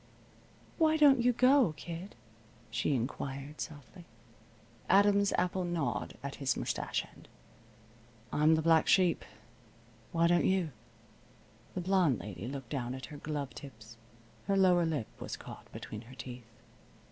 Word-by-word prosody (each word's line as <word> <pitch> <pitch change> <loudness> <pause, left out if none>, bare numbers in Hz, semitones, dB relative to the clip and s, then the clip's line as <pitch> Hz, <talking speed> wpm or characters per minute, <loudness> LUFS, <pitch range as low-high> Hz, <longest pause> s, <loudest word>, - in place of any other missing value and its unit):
"Why 315 -1 +4
don't 280 -4 +6
you 245 +1 +4
go, 250 - +4
kid?" 170 +5 -7 0.6
she 145 - 0
inquired, 135 +4 -4
softly. 160 +4 -9 0.8
Adam's 200 +1 +5
Apple 180 +1 0
gnawed 175 -4 -2
at 140 0 -5
his 135 -2 0
mustache - - -2
end. - - -17 1.1
"I'm 155 +2 +5
the 160 - 0
black 165 -1 +4
sheep. 180 -3 +4 0.9
Why 165 0 +2
don't 175 0 +4
you?" 185 -5 +1 1.0
The 185 - -1
blonde 180 - +3
lady 100 +1 -7
looked 135 -2 -6
down 125 -3 -2
at 130 - -7
her - - -7
glove 145 -2 -4
tips. 115 -5 -11 0.5
Her 195 -1 +2
lower 180 -3 +4
lip 150 -8 -1
was - - -5
caught - - -11
between 105 - -7
her 125 +2 -13
teeth. 125 -3 -9
160 Hz, 135 wpm, -32 LUFS, 135-190 Hz, 1.1 s, don't